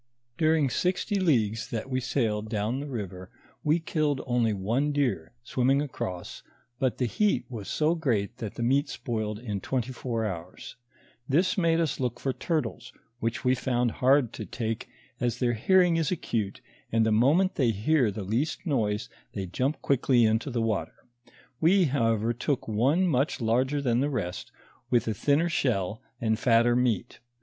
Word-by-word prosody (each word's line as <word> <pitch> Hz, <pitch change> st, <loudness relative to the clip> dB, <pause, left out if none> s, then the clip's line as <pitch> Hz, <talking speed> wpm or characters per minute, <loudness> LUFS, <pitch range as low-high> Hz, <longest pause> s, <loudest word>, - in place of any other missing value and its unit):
During 155 Hz, -1 st, +3 dB
sixty 190 Hz, -, 0 dB
leagues 115 Hz, -, +1 dB
that 115 Hz, +2 st, -4 dB
we 130 Hz, -1 st, -1 dB
sailed 110 Hz, -4 st, -1 dB
down 110 Hz, +4 st, -1 dB
the 145 Hz, -, -5 dB
river, 95 Hz, -8 st, -6 dB, 0.3 s
we 150 Hz, +2 st, +3 dB
killed 155 Hz, -4 st, 0 dB
only 120 Hz, -3 st, +2 dB
one 115 Hz, +9 st, 0 dB
deer, 130 Hz, -, -1 dB
swimming 130 Hz, +3 st, +2 dB
across, 95 Hz, -11 st, -5 dB, 0.4 s
but 130 Hz, -3 st, 0 dB
the 125 Hz, -, +1 dB
heat 210 Hz, -, +1 dB
was 110 Hz, -5 st, -7 dB
so 155 Hz, +2 st, +1 dB
great 120 Hz, -9 st, -1 dB
that 110 Hz, -4 st, -6 dB
the 120 Hz, -, -3 dB
meat 135 Hz, +5 st, +2 dB
spoiled 110 Hz, -5 st, -3 dB
in 105 Hz, -4 st, -4 dB
twenty 130 Hz, +2 st, -2 dB
four 115 Hz, -2 st, -3 dB
houre. 90 Hz, -3 st, -5 dB, 0.7 s
This 175 Hz, +9 st, +3 dB
made 165 Hz, -4 st, +2 dB
us 165 Hz, -3 st, 0 dB
look 125 Hz, -3 st, -2 dB
for 135 Hz, -, -1 dB
turtles, 140 Hz, -7 st, -3 dB, 0.3 s
which 115 Hz, 0 st, -2 dB
we 125 Hz, -, +4 dB
found 125 Hz, -2 st, 0 dB
hard 130 Hz, -1 st, +3 dB
to -, -, -6 dB
take, 115 Hz, -1 st, -4 dB, 0.3 s
as 120 Hz, -2 st, 0 dB
their 120 Hz, -2 st, +1 dB
hear 185 Hz, -, +4 dB
ing 170 Hz, -2 st, +2 dB
is 160 Hz, -3 st, +1 dB
acute, 110 Hz, -, -2 dB, 0.3 s
and 115 Hz, 0 st, +3 dB
the 110 Hz, -, +2 dB
moment 145 Hz, -, +4 dB
they 130 Hz, -5 st, +2 dB
hear 115 Hz, +4 st, +2 dB
the 100 Hz, 0 st, -5 dB
least 125 Hz, -, -2 dB
noise, 110 Hz, -, 0 dB, 0.3 s
they 100 Hz, -2 st, -3 dB
jump 130 Hz, -, -2 dB
quickly 130 Hz, -3 st, +3 dB
into 110 Hz, +5 st, +1 dB
the 120 Hz, -3 st, -1 dB
water. 100 Hz, -8 st, -1 dB, 0.6 s
We, 185 Hz, +4 st, +5 dB
however, 115 Hz, -6 st, +1 dB
took 125 Hz, +3 st, -2 dB
one 130 Hz, -, +2 dB
much 145 Hz, -3 st, +1 dB
larger 130 Hz, +5 st, +1 dB
than 120 Hz, -2 st, +2 dB
the 140 Hz, +3 st, +1 dB
rest, 105 Hz, -10 st, -4 dB, 0.4 s
with 120 Hz, -1 st, +2 dB
a 110 Hz, -, +1 dB
thinner 145 Hz, -, +2 dB
shell 110 Hz, -, -1 dB, 0.2 s
and 110 Hz, -1 st, 0 dB
fatter 120 Hz, 0 st, +4 dB
meat. 120 Hz, -5 st, 0 dB
125 Hz, 170 wpm, -27 LUFS, 110-145 Hz, 0.7 s, We